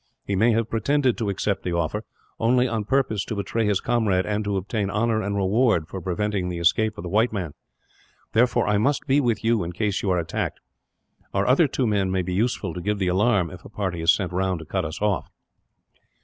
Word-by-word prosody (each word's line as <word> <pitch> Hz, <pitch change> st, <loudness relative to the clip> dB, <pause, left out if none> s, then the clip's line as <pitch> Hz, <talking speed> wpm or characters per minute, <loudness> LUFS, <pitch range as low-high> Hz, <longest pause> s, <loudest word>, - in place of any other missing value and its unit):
He 100 Hz, -, -1 dB
may 110 Hz, +5 st, +4 dB
have 115 Hz, 0 st, +1 dB
pretended 130 Hz, +3 st, +2 dB
to 110 Hz, -3 st, -1 dB
accept 100 Hz, 0 st, -1 dB
the 90 Hz, -, -3 dB
offer, 85 Hz, +6 st, -1 dB, 0.4 s
only 125 Hz, +2 st, +3 dB
on 110 Hz, -3 st, -2 dB
purpose 110 Hz, -5 st, +1 dB
to 110 Hz, -, -4 dB
betray 105 Hz, +2 st, -1 dB
his 100 Hz, -2 st, +2 dB
comrade, 110 Hz, -6 st, +1 dB
and 105 Hz, 0 st, -1 dB
to 100 Hz, -1 st, 0 dB
obtain 100 Hz, +1 st, -2 dB
honour 110 Hz, +2 st, +1 dB
and 100 Hz, 0 st, -2 dB
reward 100 Hz, -3 st, +2 dB
for 95 Hz, -, -6 dB
preventing 95 Hz, +1 st, -1 dB
the 90 Hz, -, -4 dB
escape 105 Hz, +6 st, +2 dB
of -, -, -6 dB
the -, -, -5 dB
white 110 Hz, +6 st, +2 dB
man. 90 Hz, -8 st, -4 dB, 0.8 s
Therefore, 120 Hz, +2 st, +3 dB
I 105 Hz, -1 st, +2 dB
must 140 Hz, +6 st, +1 dB
be 140 Hz, +1 st, +3 dB
with 120 Hz, -6 st, 0 dB
you, 115 Hz, -3 st, +2 dB
in 85 Hz, +1 st, -5 dB
case 100 Hz, +1 st, -1 dB
you 100 Hz, -, -1 dB
are 90 Hz, -, +2 dB
attacked. 85 Hz, -1 st, -3 dB, 0.8 s
Our 100 Hz, 0 st, +2 dB
other 140 Hz, +7 st, +4 dB
two 130 Hz, -1 st, -1 dB
men 100 Hz, -4 st, +1 dB
may 95 Hz, 0 st, 0 dB
be 90 Hz, +1 st, -3 dB
useful, 115 Hz, +6 st, -1 dB
to 90 Hz, -, -5 dB
give 105 Hz, +3 st, -1 dB
the 95 Hz, -2 st, 0 dB
alarm, 95 Hz, -1 st, +2 dB
if 90 Hz, -1 st, -11 dB
a -, -, -11 dB
party 95 Hz, -5 st, -3 dB
is 85 Hz, +2 st, +6 dB
sent 90 Hz, -3 st, -1 dB
round 95 Hz, 0 st, 0 dB
to 80 Hz, -, -9 dB
cut -, -, -2 dB
us 80 Hz, +3 st, -5 dB
off." 105 Hz, -3 st, 0 dB
105 Hz, 225 wpm, -24 LUFS, 95-115 Hz, 0.8 s, is